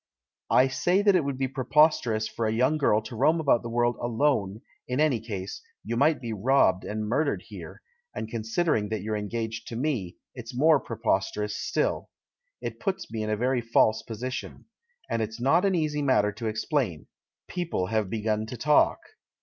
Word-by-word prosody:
"I 130 - +5
say 180 +9 +1
that 200 -2 +5
it 175 - +3
would 140 -2 -3
be 135 0 0
preposterous 130 -5 +2
for 115 - -2
a - - 0
young 130 +7 +2
girl 110 -6 +2
to 110 +2 -8
roam 160 +8 +3
about 140 -6 +3
the 120 - -6
world 120 0 +1
alone, 115 -4 0 0.3
in 125 +2 -2
any 150 -6 +3
case 100 -4 -6
— - - -59
you 115 +3 -2
might 145 +5 +3
be 115 -3 -5
robbed 105 -3 +3
and 105 0 -4
murdered 140 +6 0
here - - -10
— 485 0 -40
and - - -4
considering 110 +1 -1
that 110 -3 -3
you're 110 0 -2
engaged 110 +2 -4
to 115 - -6
me, 120 - -2 0.2
it's 120 -1 -8
more 155 +1 +5
preposterous 105 -2 -1
still. - - -1 0.5
It - - -5
puts 195 - -3
me 110 -1 -3
in 110 - -2
a 105 - 0
very 125 +2 +1
false 110 -1 +3
position. 125 +3 -6 0.4
And 115 - -1
it's 110 +1 -4
not 140 +10 +3
an 195 -2 +2
easy 150 -3 0
matter 130 -7 +3
to 110 +2 -5
explain. 110 - -1 0.4
People 170 - -2
have 105 0 -1
begun 110 0 -1
to 125 - -7
talk." 150 +5 +3
115 Hz, 190 wpm, -27 LUFS, 110-140 Hz, 0.5 s, I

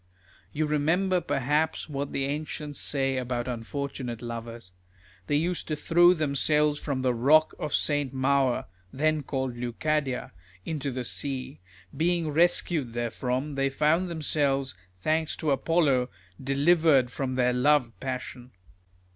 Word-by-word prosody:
You 155 +1 -1
remember 175 +5 +1
perhaps 150 +1 0
what 140 -2 -4
the 135 - -1
ancients 150 0 -4
say 135 -2 0
about 125 -1 -2
unfortunate 125 0 -5
lovers. 115 -3 -7 0.6
These 145 +2 +2
used 180 0 -2
to 155 - -1
throw 175 +4 +5
themselves 150 0 +1
from 135 -3 -3
the 125 -1 +2
rock 150 +7 +4
of 150 - -1
St. 145 -3 +1
Maur 135 -1 +1 0.3
(then 155 +2 +1
called 130 -2 -3
Leucadia) 130 +3 -2 0.3
into 145 -3 -3
the 130 -1 -4
sea; 130 - -3 0.4
being 165 +1 +1
rescued 160 -5 +2
therefrom, 125 +4 -2
they 135 0 +1
found 155 +6 +2
themselves, 145 -5 0 0.2
thanks 155 - 0
to 155 -3 -1
Apollo, 140 -4 +2 0.3
delivered 140 -1 +3
from 130 -1 -3
their 125 -1 +2
love 125 -1 +3
passion. 125 -1 -6
140 Hz, 130 wpm, -27 LUFS, 130-155 Hz, 0.6 s, throw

